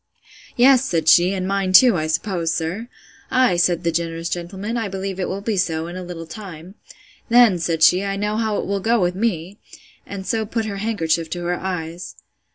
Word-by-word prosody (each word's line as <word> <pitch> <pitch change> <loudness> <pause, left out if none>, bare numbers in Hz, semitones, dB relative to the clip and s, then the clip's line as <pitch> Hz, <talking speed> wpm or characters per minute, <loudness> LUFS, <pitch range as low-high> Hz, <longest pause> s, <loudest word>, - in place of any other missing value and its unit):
Yes, 260 +1 +5
said 165 -10 -1
she, 175 +3 +6
and 185 -1 -3
mine 195 -1 -1
too, 245 +2 +7
I 155 -2 -1
suppose, 165 0 -1
sir? 175 +8 -3 0.4
Ay, 255 -7 +3
said 175 0 +1
the 170 - +1
generous 165 0 -3
gentleman, 190 +6 -4
I 225 -3 -2
believe 195 0 -5
it 185 - -2
will 195 +1 -4
be 210 0 -2
so 165 -3 -1
in 175 +1 -8
a 185 - -5
little 175 -2 -7
time.—Then, 195 +4 -1
said 165 -1 -1
she, 180 +4 +5
I 195 0 -2
know 210 +1 -2
how 220 -2 -1
it - - -3
will 200 0 -2
go 230 +4 +1
with 180 -1 +1
me! 190 -2 -3 0.5
And 195 -1 -7
so 220 +1 -1
put 225 +1 -3
her 200 -2 -4
handkerchief 170 -6 -1
to 175 +1 -5
her 175 0 -1
eyes. 175 -2 -5
190 Hz, 200 wpm, -21 LUFS, 170-210 Hz, 0.5 s, too